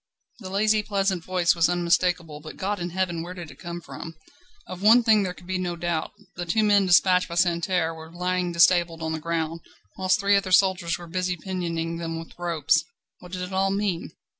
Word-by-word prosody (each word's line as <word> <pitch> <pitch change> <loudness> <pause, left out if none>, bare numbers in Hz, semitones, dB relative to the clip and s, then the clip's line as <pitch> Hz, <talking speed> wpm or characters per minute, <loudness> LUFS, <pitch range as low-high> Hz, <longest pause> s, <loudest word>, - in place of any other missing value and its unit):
The 190 -5 -8
lazy, 215 +2 +2
pleasant 195 -4 -1
voice 180 -1 +2
was 165 -1 +2
unmistakable, 175 -2 0
but, 155 +1 -10
God 200 +1 -2
in 175 0 -3
heaven! 175 -2 -2
where 175 +2 -7
did 170 -4 -8
it - - -17
come 175 -1 -6
from? 165 0 -9 0.5
Of 185 0 -8
one 230 +4 +6
thing 220 -2 +4
there 180 -2 -3
could 175 - -15
be 185 0 -2
no 175 -1 -2
doubt. 170 -1 -2 0.2
The 175 0 -5
two 220 +6 +2
men 205 -2 +4
despatched 180 0 +4
by 170 - -5
Santerne 170 -1 +1
were 160 0 -11
lying 180 0 -1
disabled 170 -1 +3
on 160 - -2
the 160 - -3
ground, 165 0 -3 0.4
whilst 185 +3 +2
three 200 0 +3
other 195 -1 0
soldiers 185 -3 +3
were 175 - -10
busy 180 +1 -2
pinioning 170 -2 -3
them 165 -1 -4
with 165 0 -9
ropes. 160 -3 +1 0.4
What 180 - -13
did 180 0 -4
it 180 +1 -6
all 190 +1 +2
mean? 195 -3 -1
175 Hz, 210 wpm, -25 LUFS, 170-190 Hz, 0.5 s, one